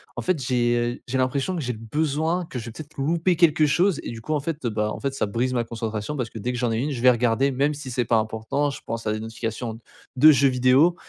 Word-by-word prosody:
en -, -, -3 dB
fait, 180 Hz, -5 st, 0 dB
j'ai 120 Hz, -1 st, 0 dB
j'ai 130 Hz, +2 st, -1 dB
l'impression 135 Hz, +8 st, 0 dB
que 165 Hz, -, -2 dB
j'ai 125 Hz, -1 st, -2 dB
besoin, 155 Hz, +9 st, -1 dB
que 130 Hz, -, -7 dB
je 115 Hz, -, -7 dB
vais -, -, -6 dB
peut-être 155 Hz, +5 st, -11 dB
louper 165 Hz, +5 st, +1 dB
quelque 160 Hz, -2 st, +4 dB
chose 175 Hz, +4 st, +2 dB
et -, -, -5 dB
du 115 Hz, -1 st, -8 dB
coup, 155 Hz, -, -3 dB
en 150 Hz, -, +1 dB
fait, 150 Hz, -1 st, -4 dB
bah, 105 Hz, -1 st, -1 dB
en -, -, -6 dB
fait, 140 Hz, -, -1 dB
bah, 135 Hz, -, -9 dB
ça 135 Hz, -, 0 dB
brise 120 Hz, +5 st, -1 dB
ma 120 Hz, -, +1 dB
concentration 115 Hz, +2 st, -4 dB
parce 120 Hz, -3 st, -2 dB
que -, -, -8 dB
dès 125 Hz, +4 st, -2 dB
que -, -, -3 dB
j'en 120 Hz, -2 st, 0 dB
ai 110 Hz, -, 0 dB
une, 140 Hz, +6 st, -1 dB
je 120 Hz, -4 st, -4 dB
vais 125 Hz, -, +7 dB
regarder 125 Hz, +3 st, +2 dB
même 140 Hz, +3 st, +1 dB
si 140 Hz, -2 st, -7 dB
c'est 120 Hz, 0 st, 0 dB
pas 115 Hz, 0 st, +3 dB
important. 110 Hz, +6 st, -1 dB
Je -, -, -8 dB
pense 115 Hz, 0 st, -4 dB
à 105 Hz, -, +1 dB
des 110 Hz, -, -3 dB
notifications 115 Hz, +1 st, -5 dB, 0.4 s
de 155 Hz, +5 st, +8 dB
jeux 140 Hz, -1 st, +4 dB
vidéo 130 Hz, +7 st, +4 dB
125 Hz, 275 wpm, -24 LUFS, 115-150 Hz, 0.4 s, de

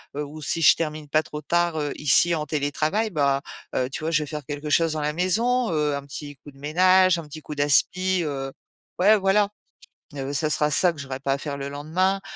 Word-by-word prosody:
ou 150 Hz, +1 st, -6 dB
heu, -, -, -11 dB
si 165 Hz, +3 st, 0 dB
je -, -, +7 dB
termine 155 Hz, -2 st, -4 dB
pas 155 Hz, +2 st, +2 dB
trop 150 Hz, -1 st, -9 dB
tard, 170 Hz, 0 st, 0 dB
heu, 145 Hz, -1 st, -2 dB
ici 150 Hz, +4 st, +4 dB
en 155 Hz, -2 st, -2 dB
télétravail, 155 Hz, +9 st, -1 dB
bah, 140 Hz, -3 st, +1 dB, 0.3 s
heu, 125 Hz, -, 0 dB
tu -, -, -5 dB
vois? 160 Hz, -, -1 dB
Je 155 Hz, -2 st, +1 dB
vais -, -, -8 dB
faire 150 Hz, -1 st, -6 dB
quelque 145 Hz, +1 st, -6 dB
chose 165 Hz, +1 st, +2 dB
dans 155 Hz, -, -3 dB
la 150 Hz, 0 st, -1 dB
maison. 230 Hz, +7 st, +1 dB
Heu, 150 Hz, -2 st, 0 dB
un 140 Hz, -, -5 dB
petit 145 Hz, 0 st, -8 dB
coup 145 Hz, -, -14 dB
de 135 Hz, -, -22 dB
ménage, 185 Hz, +4 st, +3 dB
un 160 Hz, -, -8 dB
petit 155 Hz, +1 st, -10 dB
coup 150 Hz, -, -7 dB
d'aspi 180 Hz, +6 st, +3 dB
heu, 135 Hz, -2 st, -4 dB, 0.5 s
ouais, 205 Hz, +4 st, +5 dB
voilà. 200 Hz, +1 st, +2 dB, 0.7 s
Heu, 135 Hz, 0 st, -4 dB
ce 145 Hz, +2 st, 0 dB
sera 150 Hz, 0 st, +1 dB
ça 175 Hz, +3 st, +5 dB
que 150 Hz, -, -13 dB
j'aurais 130 Hz, -1 st, -6 dB
pas 135 Hz, 0 st, -1 dB
à -, -, -2 dB
faire 140 Hz, 0 st, -5 dB
le 140 Hz, 0 st, -5 dB
lendemain. 175 Hz, +7 st, -1 dB
155 Hz, 235 wpm, -24 LUFS, 145-175 Hz, 0.7 s, je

